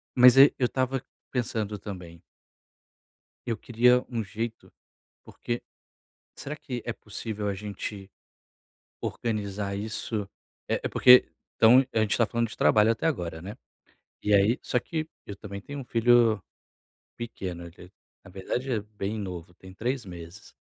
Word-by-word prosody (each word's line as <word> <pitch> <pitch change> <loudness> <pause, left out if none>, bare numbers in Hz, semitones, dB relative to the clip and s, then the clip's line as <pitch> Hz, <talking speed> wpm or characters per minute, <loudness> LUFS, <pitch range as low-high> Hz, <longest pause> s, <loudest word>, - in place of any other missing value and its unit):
mas 125 0 +8
ai 140 +1 +9
eu 130 - +2
estava 130 +1 -1 0.3
pensando 110 -4 -2
também 90 -4 -9 1.2
Eu 115 -2 -1
queria 125 +1 +3
um 115 -3 -2
jeito 110 +3 -5 0.5
porque 120 0 -5 0.7
será 150 +2 -6
que 125 -5 -6
é 120 - -2
possível 105 -1 -5
a 100 - -1
gente 100 0 -6 0.9
organizar 100 -3 -3
isso? 105 0 -3 0.4
É - - -1
porque 125 0 +7 0.3
então, 125 +4 +7
a - - +1
gente 105 -2 +1
está 115 - +4
falando 115 +1 -1
de - - -10
trabalho 110 +1 +5
até 115 - -5
agora, 85 - -2
né. 100 +5 -7 0.7
E 105 - +1
aí 100 +5 +4
só 125 - +1
que 155 +5 -4 0.2
eu 100 - -7
também 100 -1 -8
tenho 145 +6 -7
um 135 - -7
filho 115 -3 +4 0.7
pequeno, 95 -7 -6 0.6
na - - -13
verdade 120 +8 -3
é 110 - +1
bem 105 0 -5
novo 90 -4 -6
tem 95 +1 -14
3 125 +3 -2
meses. 85 0 -11
110 Hz, 140 wpm, -27 LUFS, 100-120 Hz, 1.2 s, ai